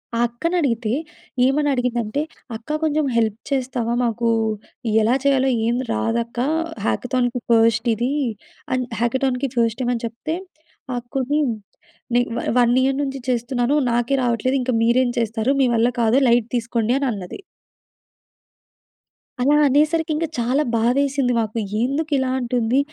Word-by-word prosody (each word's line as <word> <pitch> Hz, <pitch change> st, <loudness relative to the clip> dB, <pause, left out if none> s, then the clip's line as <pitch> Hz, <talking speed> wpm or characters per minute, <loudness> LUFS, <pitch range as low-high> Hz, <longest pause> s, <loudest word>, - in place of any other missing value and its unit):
ఆ -, -, 0 dB
అక్కని 335 Hz, +10 st, -3 dB
అడిగితే, 230 Hz, -6 st, 0 dB, 0.5 s
ఏమని 290 Hz, +2 st, +2 dB
అడిగిందంటే, 245 Hz, 0 st, -1 dB, 0.3 s
"అక్క 235 Hz, +7 st, -4 dB
కొంచెం 305 Hz, -1 st, +1 dB
హెల్ప్ 220 Hz, -2 st, +1 dB
చేస్తావా, 250 Hz, -3 st, -1 dB
మాకు 235 Hz, 0 st, 0 dB, 0.7 s
ఎలా 235 Hz, +4 st, +3 dB
చేయాలో 270 Hz, -1 st, +3 dB, 0.2 s
ఏం 235 Hz, -, +1 dB, 0.2 s
రాదక్క 235 Hz, +1 st, -1 dB, 0.5 s
హ్యాకథాన్‌కి 250 Hz, 0 st, 0 dB
ఫస్ట్ 225 Hz, +1 st, +3 dB
ఇది" 240 Hz, +5 st, -1 dB, 0.6 s
అని 255 Hz, -1 st, 0 dB, 0.2 s
హ్యాకథాన్‌కి 260 Hz, +2 st, 0 dB
ఫస్ట్ 230 Hz, 0 st, +1 dB
టైమ్ 245 Hz, -, 0 dB
అని 230 Hz, -, -6 dB
చెప్తే, 240 Hz, +8 st, -4 dB, 0.6 s
ఆ -, -, -2 dB
అక్కొని 270 Hz, +4 st, -1 dB, 0.8 s
"నే 245 Hz, -, +5 dB, 0.2 s
వా -, -, -2 dB, 0.2 s
1 240 Hz, 0 st, +4 dB
ఇయర్ 270 Hz, 0 st, +1 dB
నుంచి 270 Hz, -1 st, -4 dB
చేస్తున్నాను. 245 Hz, +2 st, 0 dB, 0.2 s
నాకే 240 Hz, +3 st, +1 dB
రావట్లేదు 245 Hz, +3 st, +1 dB
ఇంక 250 Hz, 0 st, -1 dB
మీరేం 245 Hz, +1 st, +3 dB
చేస్తారు, 225 Hz, +3 st, 0 dB
మీ 255 Hz, -, +4 dB
వల్ల 230 Hz, +1 st, +3 dB
కాదు 230 Hz, +4 st, +4 dB
లైట్ 235 Hz, -1 st, +2 dB
తీసుకోండి." 235 Hz, +1 st, 0 dB
అని 275 Hz, -, 0 dB
అన్నది. 195 Hz, -, -7 dB, 2.0 s
అలా 285 Hz, +4 st, +4 dB
అనేసరికి 310 Hz, +3 st, +2 dB
ఇంక 330 Hz, -, 0 dB
చాలా 255 Hz, +5 st, +1 dB
బాధేసింది 260 Hz, +2 st, +1 dB
మాకు. 220 Hz, 0 st, -2 dB, 0.3 s
ఎందుకు 295 Hz, +4 st, -1 dB
ఇలా 260 Hz, -1 st, 0 dB
అంటుంది, 245 Hz, +1 st, +1 dB
245 Hz, 135 wpm, -21 LUFS, 230-270 Hz, 2.0 s, నే